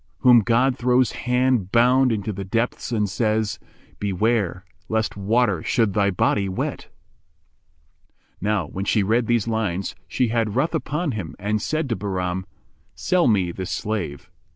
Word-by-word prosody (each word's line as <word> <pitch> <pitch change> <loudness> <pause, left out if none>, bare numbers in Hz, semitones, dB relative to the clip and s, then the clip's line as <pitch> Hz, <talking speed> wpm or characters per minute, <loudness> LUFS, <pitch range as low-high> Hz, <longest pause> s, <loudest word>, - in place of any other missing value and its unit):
[FN#394] 65 - -41
Whom 125 -2 +7
God 120 +5 +2
throws 125 0 +3
hand 125 -5 0
bound 125 +2 +4
in 110 -2 -1
the 100 -1 -4
depths 115 +5 -2
and 105 -3 +1
says, 110 +1 -1 0.2
* - - -30
Beware 100 -1 0 0.2
lest 110 0 -1
water 105 -2 +1
should 110 +1 +1
thy 100 -2 +2
body 100 +1 +1
wet?"[FN#395] 75 -5 -11
Now 105 -2 0
when 95 +6 -5
she 105 0 +2
read 115 +3 +1
these 120 -2 +1
lines, 105 -5 -1
she 125 -3 0
had 115 -2 0
ruth 150 +7 +1
upon 155 0 -1
him 100 -8 -5
and 105 +2 -1
said 155 +4 -1
to 115 - 0
Bahram, 95 -1 -3 0.5
"Sell 180 -4 +2
me 95 -6 +2
this 95 +1 -6
slave." 100 -13 -4
110 Hz, 155 wpm, -23 LUFS, 95-120 Hz, 0.5 s, Whom